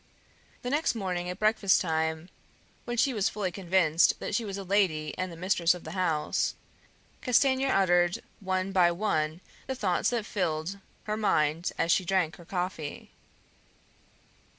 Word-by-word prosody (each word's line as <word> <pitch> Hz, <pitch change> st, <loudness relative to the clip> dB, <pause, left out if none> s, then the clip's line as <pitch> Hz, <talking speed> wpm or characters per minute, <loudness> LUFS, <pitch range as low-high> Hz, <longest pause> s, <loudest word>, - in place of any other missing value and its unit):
The 245 Hz, -, -3 dB
next 295 Hz, -2 st, +1 dB
morning 180 Hz, -4 st, -2 dB
at 180 Hz, -, -5 dB
breakfast 215 Hz, -2 st, +3 dB
time, 160 Hz, 0 st, -1 dB, 0.6 s
when 240 Hz, 0 st, -3 dB
she 265 Hz, +3 st, +3 dB
was 210 Hz, -4 st, +1 dB
fully 200 Hz, -3 st, -3 dB
convinced 175 Hz, -3 st, +2 dB
that -, -, -4 dB
she 230 Hz, -, +1 dB
was 200 Hz, -2 st, -5 dB
a 200 Hz, -, -5 dB
lady 175 Hz, -6 st, +1 dB
and 185 Hz, -1 st, -3 dB
the 165 Hz, -, -10 dB
mistress 180 Hz, -1 st, +2 dB
of 180 Hz, -, -10 dB
the 160 Hz, -, -7 dB
house, 165 Hz, -5 st, 0 dB, 0.7 s
Castanier 265 Hz, +2 st, +3 dB
uttered 175 Hz, -2 st, +3 dB, 0.2 s
one 185 Hz, 0 st, -1 dB
by 180 Hz, -3 st, +4 dB
one 170 Hz, -4 st, -1 dB, 0.3 s
the 265 Hz, -, -2 dB
thoughts 190 Hz, -7 st, +1 dB
that 235 Hz, -3 st, -2 dB
filled 175 Hz, -1 st, -2 dB, 0.2 s
her 215 Hz, 0 st, -2 dB
mind 165 Hz, -5 st, +1 dB
as 165 Hz, -, +1 dB
she 190 Hz, -, +3 dB
drank 175 Hz, -3 st, 0 dB
her 170 Hz, -, -14 dB
coffee. 180 Hz, -4 st, -4 dB
185 Hz, 155 wpm, -28 LUFS, 165-205 Hz, 0.7 s, by